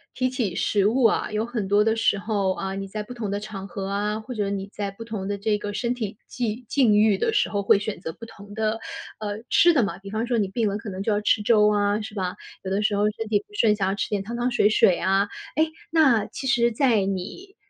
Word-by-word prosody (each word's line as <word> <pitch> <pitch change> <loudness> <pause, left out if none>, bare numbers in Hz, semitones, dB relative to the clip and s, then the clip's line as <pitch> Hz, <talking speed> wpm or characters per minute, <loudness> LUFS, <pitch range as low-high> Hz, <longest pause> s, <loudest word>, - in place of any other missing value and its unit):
提 255 0 +1
起 235 -8 -2
食 200 +2 +1
物 235 +4 +3
啊， 225 - +2
有 215 +1 0
很 230 -4 -3
多 205 +1 +4
的 220 +1 +2
时 205 -3 +2
候， 200 -3 0
啊， 190 +1 -4
你 195 0 -4
在 210 +2 -5
不 245 +4 -9
同 215 -4 -4
的 200 - -1
场 205 -2 -7
合 195 +1 -5
啊， 205 +2 -1
或 230 +3 -8
者 205 -2 -1
你 195 -1 -3
在 200 -2 -4
不 200 +4 -9
同 215 -4 -5
的 200 0 -3
这 210 +1 +1
个 205 0 -5
身 235 +3 -1
体 215 -3 -5
际 240 0 -3
境 245 -7 +4
遇 210 -1 +4
的 - - 0
时 - - +2
候 205 -1 -1
会 200 - +5
选 205 -1 -4
择 165 -3 -6
不 - - -16
同 205 -2 -13
的， 220 0 -1 0.4
呃， 210 0 -4
吃 345 0 +6
的 280 - +4
嘛。 180 -4 -3
比 195 +1 -10
方 225 +2 -2
说 240 - +1
你 205 -3 +1
病 215 +2 0
了， 200 - -2
可 225 - -10
能 190 +1 -5
就 215 +2 0
要 205 - +2
吃 210 0 +2
粥 210 -1 +4
啊， 205 0 +2
是 215 - -7
吧？ 185 -3 -3 0.3
有 190 - -4
的 200 +2 0
时 210 0 +1
候 205 +1 +2
身 220 +1 -5
体 210 -1 +2
不 415 - -15
顺， 220 - +4
想 200 -2 0
要 195 - -1
吃 200 - -2
点 205 -2 -1
汤 230 +5 -6
汤 245 +1 0
水 215 -3 +4
水 185 -4 +4
啊。 195 +2 +2 0.3
诶， 315 +1 +2 0.2
那 275 -9 +4
其 - - -7
实 240 -2 +3
在 230 -4 +2
你， 195 - -5
210 Hz, 290 characters per minute, -24 LUFS, 200-230 Hz, 0.4 s, 吃